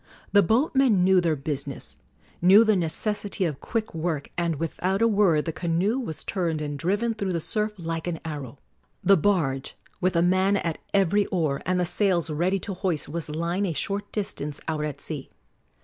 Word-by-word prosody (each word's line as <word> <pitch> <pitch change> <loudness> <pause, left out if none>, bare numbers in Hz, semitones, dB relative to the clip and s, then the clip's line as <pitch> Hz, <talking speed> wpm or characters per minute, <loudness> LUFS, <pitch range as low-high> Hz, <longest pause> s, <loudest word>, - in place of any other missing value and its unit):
The 200 - +6
boatmen 240 - +3
knew 185 0 +5
their 165 -3 +1
business 140 -1 -5 0.4
knew 190 +5 +8
the 215 -2 +3
necessity 195 +3 0
of 150 -5 -3
quick 225 -1 -3
work 160 -3 -3
and 170 -2 0
without 180 +5 -1
a 230 - +4
word 200 -8 +3
the 165 - -2
canoe 180 +10 0
was 160 - -5
turned 170 -5 -1
and 145 -1 -3
driven 205 +8 0
through 200 -4 -2
the 170 - 0
surf 210 +5 -1
like 165 -1 -4
an 165 -2 -2
arrow. 145 -5 -6 0.5
The 195 +2 +6
barge, 150 -8 0 0.2
with 180 0 +1
a 170 - +4
man 190 +3 +3
at 165 -4 -2
every 200 +1 +3
oar 155 -6 0
and 185 0 +1
the 180 - +2
sails 175 -2 +1
ready 175 +6 +1
to 200 - -4
hoist, 180 -6 -1
was 165 0 -3
lying 170 +6 -1
a 170 - -1
short 200 +7 -3
distance 150 -8 -4
out 155 -2 -1
at 150 -2 -4
sea. - - -6
175 Hz, 185 wpm, -25 LUFS, 160-200 Hz, 0.5 s, knew